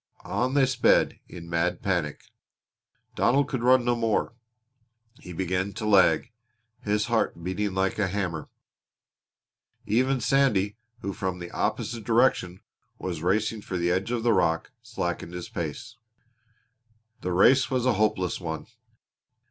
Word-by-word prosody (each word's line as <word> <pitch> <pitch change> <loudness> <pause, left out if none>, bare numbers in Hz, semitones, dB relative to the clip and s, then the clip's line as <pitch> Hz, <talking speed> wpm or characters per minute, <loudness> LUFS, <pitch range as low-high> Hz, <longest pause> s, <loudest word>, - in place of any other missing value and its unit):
On 130 +2 -1
they 140 -2 +5
sped 130 -2 +2
in 85 -2 -9
mad 85 +3 -1
panic. 85 -7 -1 0.9
Donald 140 +3 +2
could 135 -5 -3
run 125 0 +4
no 120 0 +2
more. 115 0 0 0.9
He 90 - -10
began 95 +2 -2
to 110 - -5
lag, 95 -6 +4 0.5
his 105 0 0
heart 110 -7 0
beating 95 +2 -2
like 95 +2 0
a 100 - +2
hammer. 90 -5 -3 1.4
Even 130 +5 +2
Sandy, 115 -7 +2 0.3
who 100 -2 -3
from 95 -1 -3
the 85 -1 -8
opposite 110 +1 -2
direction 110 -6 +2 0.4
was 85 -4 -4
racing 105 +5 0
for 95 - -4
the 85 0 +1
edge 95 +4 0
of 120 -2 -1
the 120 -1 +4
rock, 85 -4 +1
slackened 90 -7 -4
his 90 - -6
pace. 85 +9 -5 1.2
The 90 - -2
race 130 +9 +5
was 130 -2 0
a 130 - +4
hopeless 105 -3 0
one. 80 -2 -4
100 Hz, 140 wpm, -26 LUFS, 90-120 Hz, 1.4 s, they